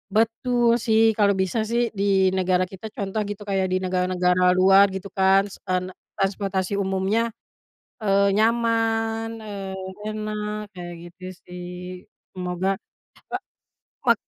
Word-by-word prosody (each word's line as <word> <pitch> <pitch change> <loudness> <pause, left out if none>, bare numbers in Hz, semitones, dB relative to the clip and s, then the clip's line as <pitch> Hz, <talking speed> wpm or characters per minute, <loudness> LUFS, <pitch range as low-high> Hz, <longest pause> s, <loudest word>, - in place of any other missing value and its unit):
Betul, 235 +1 +2
sih. 220 -2 +4 0.2
Kalau 200 -1 +5
bisa 190 +4 0
sih 235 +1 +2 0.2
di - - +2 0.3
negara 185 0 +2
kita 190 +3 -7
contoh 200 +1 -2
gitu, 205 0 -6
kayak 190 -1 +1
di 185 - +2
negara-negara 180 0 +1
luar 195 +2 +7
gitu 190 +1 -6
kan, 190 +1 +5
s - - -11
e - - -2
ne 185 - -7 0.3
transportasi 195 -1 -1
umumnya, 190 +3 +1 0.8
eee, 200 -1 +3
nyaman, 225 0 +1
eee, 200 -3 -6 0.3
enak 215 0 -3
kayak 175 -1 -7 0.2
gitu, 180 +2 -26 0.2
sih. 180 0 -8 0.6
Semoga, 180 0 -3 0.5
e - - -22 0.8
ma - - +6
195 Hz, 130 wpm, -24 LUFS, 185-220 Hz, 0.8 s, luar